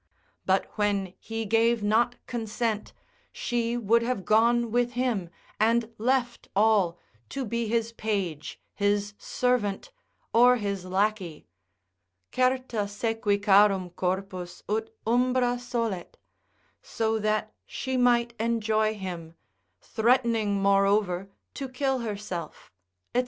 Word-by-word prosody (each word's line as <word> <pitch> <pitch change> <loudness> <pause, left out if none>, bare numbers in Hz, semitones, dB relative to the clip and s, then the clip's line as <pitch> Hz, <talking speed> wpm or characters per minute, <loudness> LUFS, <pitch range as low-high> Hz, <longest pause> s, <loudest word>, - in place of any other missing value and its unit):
But 190 0 +3
when 200 -3 0
he 225 0 -4
gave 225 +1 +2
not 230 +4 +2
consent, 225 -2 -2 0.4
she 240 -1 -1
would 230 0 +3
have 230 -6 -2
gone 235 +2 +3
with 245 +1 +1
him, 235 -8 -1 0.3
and 230 +1 +2
left 245 +1 0
all, 200 -5 +3 0.3
to 275 -2 -3
be 235 +1 -2
his 230 +1 0
page, 200 -9 -3
his 205 0 0
servant, 250 - -1 0.4
or 245 +2 +6
his 200 -5 -3
lackey, 190 -3 -1 0.9
Certa 255 -4 +1
sequi 205 0 0
charum 200 -2 +4
corpus 185 -1 -3
ut 220 +2 -1 0.2
umbra 245 +1 +2
solet, 230 -7 -3 0.7
so 225 -1 -1
that 215 0 -1
she 260 -1 -3
might 240 -1 +3
enjoy 220 -1 +1
him, 175 -5 -7 0.5
threatening 225 -3 +1
moreover 195 -1 +2 0.2
to 270 -2 -5
kill 265 +1 0
herself, 205 -7 -6 0.4
&c. - - +4
220 Hz, 110 wpm, -27 LUFS, 200-235 Hz, 0.9 s, or